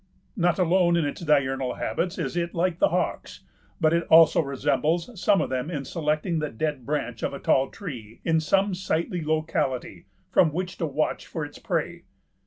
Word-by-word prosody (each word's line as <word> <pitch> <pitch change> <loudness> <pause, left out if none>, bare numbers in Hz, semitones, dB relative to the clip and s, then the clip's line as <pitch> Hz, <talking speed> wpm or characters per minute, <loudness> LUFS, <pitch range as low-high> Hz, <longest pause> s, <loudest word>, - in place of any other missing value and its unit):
Not 175 -3 +2
alone 175 -1 +3
in 165 - +1
its 145 - -4
diurnal 135 -5 +1
habits 180 +1 -2
is 165 -3 -3
it 170 0 -2
like 170 0 0
the - - +5
hawks, - - -2 0.4
but 160 -2 +3
it 170 0 0
also 165 0 +7
resembles 155 - 0
some 200 - +4
of - - -3
them 130 +3 -2
in 145 -5 -4
selecting 155 +2 -1
the 150 -1 -2
dead 140 +1 -3
branch 140 -6 -2
of - - -2
a - - -7
tall 135 0 +2
tree 120 - -8
in 160 -1 +3
some 195 +5 +2
sightly 180 -1 -2
locality 150 -4 -2 0.2
from 160 - +4
which 180 +3 -4
to 165 - 0
watch 140 - -2
for - - -4
its - - -12
prey. - - -3
160 Hz, 185 wpm, -25 LUFS, 140-175 Hz, 0.4 s, also